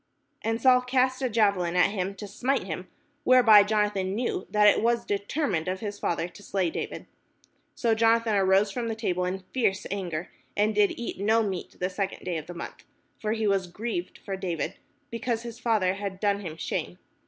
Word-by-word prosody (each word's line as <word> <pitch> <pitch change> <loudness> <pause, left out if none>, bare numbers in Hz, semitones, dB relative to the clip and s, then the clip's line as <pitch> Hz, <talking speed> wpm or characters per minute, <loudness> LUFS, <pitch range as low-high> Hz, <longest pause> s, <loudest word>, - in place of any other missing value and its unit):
And 225 0 -1
Saul 250 +1 +5
cast 255 +1 +1
a 260 - +1
javelin 200 -6 +2
at 180 +2 +4
him 195 -1 -3
to 205 +2 -7
smite 250 +7 0
him: 180 0 -5 0.4
whereby 240 -5 +8
Jonathan 205 -2 0
knew 235 -4 -2
that 210 0 +4
it 205 - +5
was 235 +1 +1
determined 200 - -1
of 185 +1 -2
his 205 -1 -5
father 170 0 -1
to 190 - -15
slay 190 -4 -1
David. - - -5 0.7
So 235 -6 +2
Jonathan 225 0 +3
arose 195 +1 +3
from 235 +3 -3
the 225 - -2
table 180 -5 -1
in 185 +1 -3
fierce 200 -7 +1
anger, 180 -4 -3 0.3
and 210 +1 +3
did 205 -1 +2
eat 235 - -5
no 220 +3 +3
meat 190 -4 -4
the 180 - 0
second 190 +1 -4
day 175 -2 -1
of 155 0 -7
the 175 - -8
month: 170 - -8 0.4
for 215 0 -1
he 220 -1 -1
was 195 -2 +1
grieved 185 0 -4
for 195 - -5
David, 180 -3 -3 0.4
because 230 0 -2
his 235 0 -8
father 215 -6 +2
had 195 -1 -5
done 200 -1 +1
him 165 -5 -7
shame. - - -3
205 Hz, 195 wpm, -27 LUFS, 185-230 Hz, 0.7 s, whereby